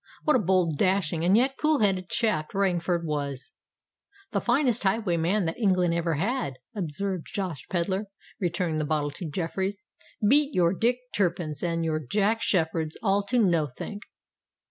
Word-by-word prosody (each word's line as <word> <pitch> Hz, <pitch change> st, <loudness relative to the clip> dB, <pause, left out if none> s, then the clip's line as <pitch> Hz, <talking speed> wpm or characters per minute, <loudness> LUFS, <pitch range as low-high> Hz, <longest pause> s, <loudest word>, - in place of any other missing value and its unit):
What 305 Hz, -, +3 dB
a -, -, +4 dB
bold, 180 Hz, -6 st, +1 dB
dashing, 185 Hz, -4 st, +1 dB
and 185 Hz, +4 st, +5 dB
yet 265 Hz, +3 st, +2 dB
cool 310 Hz, 0 st, +3 dB
headed 190 Hz, -5 st, +1 dB
chap 210 Hz, -10 st, 0 dB
Rainford 175 Hz, -3 st, +1 dB
was!" 140 Hz, -3 st, -3 dB, 0.8 s
"The -, -, 0 dB
finest 245 Hz, -2 st, +2 dB
highwayman 190 Hz, -2 st, +1 dB
that 165 Hz, +7 st, -3 dB
England 185 Hz, -5 st, +2 dB
ever 170 Hz, -1 st, 0 dB
had," 195 Hz, -, -1 dB, 0.2 s
observed 185 Hz, 0 st, -3 dB
Josh 180 Hz, -8 st, -4 dB
Pedler, 190 Hz, +3 st, -1 dB, 0.3 s
returning 175 Hz, -3 st, -1 dB
the 155 Hz, -, 0 dB
bottle 150 Hz, -1 st, 0 dB
to 160 Hz, +2 st, -6 dB
Jeffreys. 190 Hz, +5 st, -3 dB, 0.4 s
"Beat 290 Hz, +4 st, +4 dB
your 175 Hz, -1 st, +3 dB
Dick 235 Hz, +5 st, +1 dB, 0.2 s
Turpins 170 Hz, -6 st, -1 dB
and 165 Hz, -1 st, -1 dB
your 155 Hz, -1 st, 0 dB
Jack 210 Hz, -, 0 dB
Sheppards 160 Hz, -3 st, 0 dB
all 200 Hz, -1 st, +3 dB
to 250 Hz, +5 st, 0 dB
nothink!" 175 Hz, -, 0 dB
185 Hz, 150 wpm, -27 LUFS, 165-205 Hz, 0.8 s, and